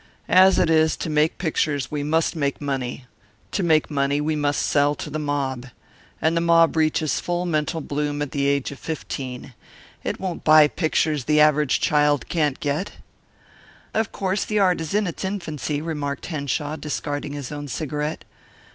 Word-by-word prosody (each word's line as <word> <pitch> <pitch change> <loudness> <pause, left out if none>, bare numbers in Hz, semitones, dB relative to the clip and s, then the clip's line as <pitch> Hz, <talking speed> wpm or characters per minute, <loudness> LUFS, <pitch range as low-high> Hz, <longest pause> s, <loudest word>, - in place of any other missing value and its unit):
As 190 +1 +6
it - - +3
is, 160 -1 +3
to 160 - -4
make 150 +1 +2
pictures 150 -6 -1
we 150 -1 -2
must 160 +3 +1
make 140 -3 -1
money. 135 -3 -3 0.5
To - - -1
make 160 -3 +2
money 140 0 +1
we 155 +1 0
must 145 -1 0
sell 145 0 +2
to 150 - -7
the 155 - -3
mob. 135 -4 -2 0.5
And 160 +1 +1
the 170 - +2
mob 165 -1 +4
reaches 155 -1 +1
full 175 0 -2
mental 160 -1 -1
bloom 145 0 -2
at 145 - -6
the 140 -1 0
age 140 -1 0
of 140 - -10
fifteen. 130 -5 -6 0.5
It - - -3
won't 185 -2 -4
buy 155 -1 +7
pictures 155 -4 0
the 150 0 +3
average 150 -2 +4
child 150 -1 +2
can't 150 -5 0
get." 150 +7 -2 1.0
"Of 220 -1 0
course 195 +1 -1
the 215 - -2
art 185 -4 +3
is 160 +4 -3
in 210 0 +2
its 175 - -5
infancy," 155 -6 -3
remarked 145 -4 -3
Henshaw, 150 -1 -3
discarding 145 0 -4
his 145 -2 -6
own 145 0 -5
cigarette. 150 +2 -3
150 Hz, 175 wpm, -23 LUFS, 145-160 Hz, 1.0 s, buy